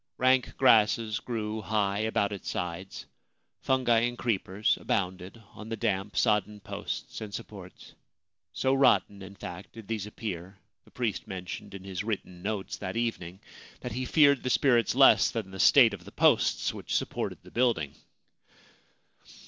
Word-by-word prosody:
Rank 130 Hz, 0 st, +2 dB
grasses 110 Hz, -3 st, +4 dB
grew 110 Hz, -2 st, -4 dB
high 105 Hz, -1 st, 0 dB
about 110 Hz, -2 st, 0 dB
its 100 Hz, -3 st, -6 dB
sides; 90 Hz, +2 st, -5 dB, 0.5 s
fungi 130 Hz, -3 st, +2 dB
and 120 Hz, +1 st, -1 dB
creepers 105 Hz, -3 st, 0 dB
abounded 95 Hz, +2 st, -2 dB
upon 110 Hz, 0 st, -13 dB
the 115 Hz, -, -3 dB
damp, 105 Hz, -2 st, -2 dB
sodden 105 Hz, -2 st, +1 dB
posts 100 Hz, -, -6 dB
and 105 Hz, -2 st, -6 dB
supports; 100 Hz, -4 st, -10 dB, 0.6 s
so 130 Hz, -, 0 dB
rotten, 130 Hz, -7 st, +3 dB
in 95 Hz, +1 st, -10 dB
fact, 90 Hz, -1 st, -9 dB
did 115 Hz, -2 st, -11 dB
these 110 Hz, -3 st, -3 dB
appear, 95 Hz, -3 st, -6 dB, 0.3 s
the -, -, -19 dB
priest 115 Hz, -5 st, -3 dB
mentioned 90 Hz, +1 st, -7 dB
in 95 Hz, -, -9 dB
his 95 Hz, 0 st, -5 dB
written 95 Hz, -5 st, -5 dB
notes 100 Hz, 0 st, -3 dB
that 95 Hz, +4 st, -5 dB
evening 95 Hz, -6 st, -3 dB, 0.4 s
that -, -, -5 dB
he 125 Hz, +4 st, -3 dB
feared 140 Hz, -1 st, +4 dB
the 125 Hz, -, -2 dB
spirits 120 Hz, -5 st, +3 dB
less -, -, +6 dB
than 105 Hz, -5 st, -5 dB
the 95 Hz, -, -9 dB
state 120 Hz, -2 st, +6 dB
of 95 Hz, -3 st, -8 dB
the 100 Hz, -, -12 dB
posts -, -, +2 dB
which -, -, -5 dB
supported -, -, -2 dB
the -, -, -15 dB
building. 115 Hz, -, +1 dB
105 Hz, 155 wpm, -28 LUFS, 95-115 Hz, 0.6 s, less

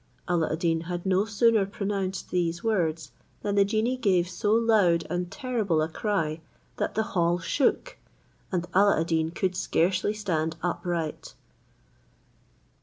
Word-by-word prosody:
Alla 170 Hz, -3 st, +1 dB
ad 160 Hz, -, -1 dB
Deen 165 Hz, -1 st, 0 dB
had 175 Hz, 0 st, -4 dB
no 190 Hz, +1 st, +2 dB
sooner 220 Hz, 0 st, +3 dB
pronounced 195 Hz, -1 st, -3 dB
these 170 Hz, -1 st, -1 dB
words, 165 Hz, -8 st, 0 dB, 0.3 s
than 205 Hz, -, -1 dB
the 200 Hz, 0 st, +5 dB
genie 220 Hz, +5 st, 0 dB
gave 185 Hz, -7 st, +2 dB
so 185 Hz, +3 st, -1 dB
loud 215 Hz, -8 st, +3 dB
and 175 Hz, 0 st, -2 dB
terrible 215 Hz, -7 st, -1 dB
a 155 Hz, -, +1 dB
cry, 165 Hz, -4 st, -2 dB, 0.4 s
that -, -, -2 dB
the 220 Hz, -, +2 dB
hall 175 Hz, -1 st, +2 dB
shook, 275 Hz, -, 0 dB, 0.5 s
and 175 Hz, -2 st, -1 dB
Alla 200 Hz, -2 st, +4 dB
ad -, -, 0 dB
Deen 160 Hz, -1 st, 0 dB
could 180 Hz, +2 st, -2 dB
scarcely 185 Hz, +3 st, +1 dB
stand 165 Hz, -6 st, -1 dB
upright. 175 Hz, -2 st, -3 dB
180 Hz, 145 wpm, -27 LUFS, 170-205 Hz, 0.5 s, the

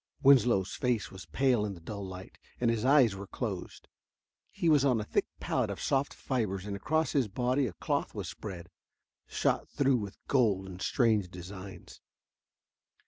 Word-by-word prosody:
Winslow's 120 Hz, -8 st, +5 dB
face 125 Hz, -4 st, -1 dB
was 95 Hz, -6 st, -10 dB
pale 125 Hz, -, +2 dB
in 100 Hz, -2 st, -3 dB
the -, -, -12 dB
dull 100 Hz, +4 st, -6 dB
light, 95 Hz, 0 st, -9 dB, 0.2 s
and 120 Hz, -1 st, +3 dB
his 115 Hz, -1 st, -1 dB
eyes 130 Hz, -6 st, +5 dB
were 100 Hz, 0 st, -7 dB
closed. -, -, -5 dB, 0.6 s
He 170 Hz, -, -2 dB
was 150 Hz, -4 st, +5 dB
on 130 Hz, -5 st, +3 dB
a -, -, -2 dB
thick -, -, 0 dB
pallet -, -, 0 dB
of -, -, -5 dB
soft 135 Hz, +1 st, 0 dB
fibers 105 Hz, -7 st, -2 dB
and 100 Hz, -1 st, -4 dB
across 160 Hz, +10 st, 0 dB
his 135 Hz, -6 st, +2 dB
body 125 Hz, +5 st, 0 dB
a 100 Hz, -, -6 dB
cloth -, -, -2 dB
was -, -, -4 dB
spread, 90 Hz, -4 st, -8 dB, 0.6 s
shot -, -, 0 dB
through 135 Hz, -3 st, +2 dB
with 100 Hz, -4 st, -6 dB
gold 105 Hz, -8 st, +2 dB
in 95 Hz, -1 st, -9 dB
strange 110 Hz, -4 st, +2 dB
designs. 95 Hz, 0 st, -10 dB
110 Hz, 170 wpm, -30 LUFS, 95-130 Hz, 0.6 s, Winslow's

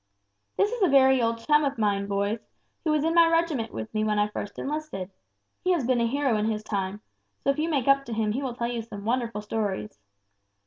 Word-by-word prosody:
"This 410 Hz, +1 st, +3 dB
is 485 Hz, -2 st, -4 dB
a 380 Hz, -, +5 dB
very 265 Hz, -3 st, +5 dB
old 230 Hz, 0 st, +1 dB
chum 300 Hz, 0 st, +4 dB
of 280 Hz, -2 st, -1 dB
mine, 200 Hz, -2 st, +1 dB
boys, 200 Hz, +2 st, -1 dB, 0.4 s
who 320 Hz, -, 0 dB
was 305 Hz, -1 st, +2 dB
in 325 Hz, +1 st, +1 dB
my 335 Hz, -1 st, +6 dB
regiment 330 Hz, -8 st, +1 dB
with 110 Hz, -1 st, -6 dB
me 215 Hz, -, 0 dB
when 210 Hz, -1 st, +1 dB
I 205 Hz, 0 st, +2 dB
first 205 Hz, -1 st, -6 dB
enlisted; 285 Hz, -11 st, -4 dB, 0.5 s
he 365 Hz, 0 st, +3 dB
has 310 Hz, -8 st, 0 dB
been 245 Hz, -1 st, +2 dB
a 235 Hz, -, +2 dB
hero 270 Hz, -2 st, +1 dB
in 210 Hz, -, 0 dB
his 215 Hz, -1 st, -2 dB
time, 200 Hz, -1 st, -3 dB, 0.4 s
so 275 Hz, -, +3 dB
if 275 Hz, -, -4 dB
you 320 Hz, +2 st, 0 dB
make 280 Hz, -5 st, 0 dB
up 275 Hz, 0 st, +4 dB
to 235 Hz, -, -5 dB
him 220 Hz, -1 st, 0 dB
he 255 Hz, +6 st, -2 dB
will 255 Hz, -3 st, -3 dB
tell 235 Hz, -, -2 dB
you 240 Hz, -1 st, -2 dB
some 210 Hz, -2 st, -9 dB
wonderful 230 Hz, -2 st, -1 dB
stories. 205 Hz, -, -3 dB
235 Hz, 235 wpm, -26 LUFS, 210-285 Hz, 0.5 s, my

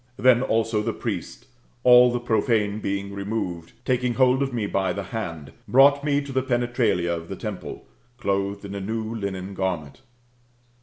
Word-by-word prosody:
Then 125 Hz, -1 st, +5 dB
also 115 Hz, -3 st, +1 dB
the 115 Hz, +1 st, -2 dB
priest, -, -, -5 dB, 0.4 s
all 125 Hz, 0 st, +7 dB
the 120 Hz, -, -1 dB
profane 110 Hz, -2 st, +1 dB
being 100 Hz, -1 st, -3 dB
removed, 100 Hz, -4 st, -4 dB
taking 125 Hz, -1 st, 0 dB
hold 130 Hz, 0 st, +4 dB
of 135 Hz, -1 st, 0 dB
me 115 Hz, -4 st, -2 dB
by 95 Hz, -2 st, 0 dB
the 100 Hz, -, -4 dB
hand, 85 Hz, -, -6 dB, 0.2 s
brought 140 Hz, +2 st, +5 dB
me 145 Hz, -1 st, +1 dB
to 140 Hz, -1 st, -8 dB
the 130 Hz, 0 st, +1 dB
penetralia 120 Hz, -8 st, 0 dB
of 85 Hz, 0 st, -8 dB
the -, -, -4 dB
temple, -, -, -7 dB, 0.3 s
clothed 100 Hz, -2 st, -2 dB
in 100 Hz, -, -7 dB
a 100 Hz, -, -4 dB
new 110 Hz, +2 st, -3 dB
linen 100 Hz, -3 st, -4 dB
garment. 95 Hz, -, -3 dB
110 Hz, 165 wpm, -24 LUFS, 100-125 Hz, 0.4 s, all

